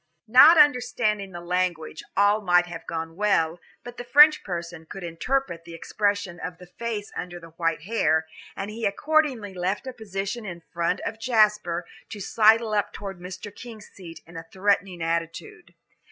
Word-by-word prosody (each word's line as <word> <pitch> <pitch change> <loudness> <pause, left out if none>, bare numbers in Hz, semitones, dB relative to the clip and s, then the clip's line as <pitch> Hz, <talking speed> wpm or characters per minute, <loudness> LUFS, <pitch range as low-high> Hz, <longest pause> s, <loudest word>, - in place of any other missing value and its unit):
Not 280 +9 +8
understanding 245 -8 +2
the 175 -1 -8
language, 175 -3 -2 0.2
all 205 +2 +4
might 175 -2 +3
have 175 -2 -9
gone 165 0 -5
well, 175 -4 +1 0.2
but 245 0 -10
the - - -6
French 295 +5 +6
person 170 -2 -6
could 195 - -8
interpret 175 +2 -2
the 170 -1 -10
expression 200 0 -2
of 175 +1 -6
the 180 - -13
face 215 +2 -5
under 175 -1 -6
the 165 -1 -13
white 165 -2 -2
hair, 160 -6 +1 0.3
and 200 +2 -5
he 225 +2 -8
accordingly 260 -3 0
left 185 +6 -2
a 260 - -6
position 200 0 -5
in 175 -4 -7
front 170 +2 -1
of 220 +1 -5
Jasper 210 -7 +2 0.2
to 210 - -8
sidle 220 +2 +3
up 205 -1 0
toward 195 -3 -7
Mr. 185 +3 -9
King's 230 -4 -11
seat 165 -4 -11
in 170 - -16
a 165 0 -9
threatening 190 -3 0
attitude. 165 +1 -4
195 Hz, 170 wpm, -25 LUFS, 170-220 Hz, 0.3 s, Not